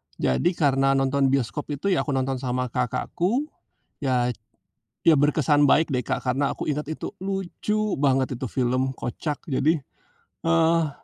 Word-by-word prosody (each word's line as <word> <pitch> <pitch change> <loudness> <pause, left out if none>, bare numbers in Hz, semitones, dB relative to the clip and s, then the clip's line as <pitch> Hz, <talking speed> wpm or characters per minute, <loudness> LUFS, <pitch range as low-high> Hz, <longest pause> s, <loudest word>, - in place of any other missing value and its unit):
jadi 65 - +1
karena 135 -3 +3
nonton 135 0 +2
bioskop 135 +1 -1
itu, 200 +8 -1
ya 180 - +2
aku 140 -3 -1
nonton 130 0 0
sama 125 -1 -2
kakakku, 175 - -1 0.5
ya. 125 -3 +1 0.8
Ya, 160 - +7
berkesan 145 0 +3
baik 160 +3 +4
deh, 125 -2 0
Kak, - - -1
karena 135 +3 +1
aku - - -5
inget 150 0 -1
itu - - -5
lucu 195 +2 -2
banget 135 -2 +1
itu 130 - -5
film, 130 +1 0
kocak, 145 +4 -4
jadi 155 +3 +2 0.6
eh 165 -1 +3
140 Hz, 145 wpm, -24 LUFS, 130-160 Hz, 0.8 s, Ya